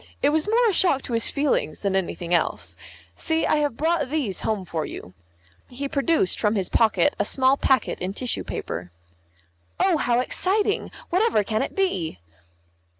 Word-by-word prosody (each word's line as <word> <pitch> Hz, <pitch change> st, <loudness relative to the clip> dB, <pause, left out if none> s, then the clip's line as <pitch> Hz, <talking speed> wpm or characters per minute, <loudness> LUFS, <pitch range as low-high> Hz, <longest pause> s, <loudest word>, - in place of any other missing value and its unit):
It 285 Hz, -, +5 dB
was 310 Hz, +3 st, +1 dB
more 465 Hz, +2 st, +3 dB
a 420 Hz, -, +2 dB
shock 335 Hz, -7 st, +2 dB
to 245 Hz, -, -5 dB
his 230 Hz, 0 st, +3 dB
feelings 280 Hz, -, 0 dB
than 195 Hz, -2 st, 0 dB
anything 175 Hz, -2 st, -2 dB
else. 175 Hz, -, 0 dB, 0.4 s
See, 320 Hz, -1 st, 0 dB
I -, -, +2 dB
have 290 Hz, -5 st, -1 dB
brought 320 Hz, -3 st, 0 dB
these 265 Hz, -, -1 dB
home 210 Hz, -4 st, -2 dB
for 160 Hz, -3 st, -3 dB
you." 90 Hz, -, -8 dB, 0.6 s
He 275 Hz, +3 st, -4 dB
produced 280 Hz, -, +1 dB
from 210 Hz, 0 st, +1 dB
his 190 Hz, -3 st, 0 dB
pocket 230 Hz, +5 st, +3 dB
a -, -, +3 dB
small 265 Hz, 0 st, +3 dB
packet 265 Hz, -1 st, +1 dB
in 185 Hz, +2 st, -4 dB
tissue 250 Hz, +1 st, -1 dB
paper. 90 Hz, +2 st, -5 dB, 0.9 s
"Oh, 370 Hz, -4 st, +3 dB
how 240 Hz, -4 st, +1 dB
exciting! 405 Hz, +10 st, 0 dB, 0.2 s
Whatever 375 Hz, -, +2 dB
can 215 Hz, +1 st, -1 dB
it -, -, -4 dB
be?" 275 Hz, -, -1 dB
260 Hz, 170 wpm, -24 LUFS, 200-320 Hz, 0.9 s, It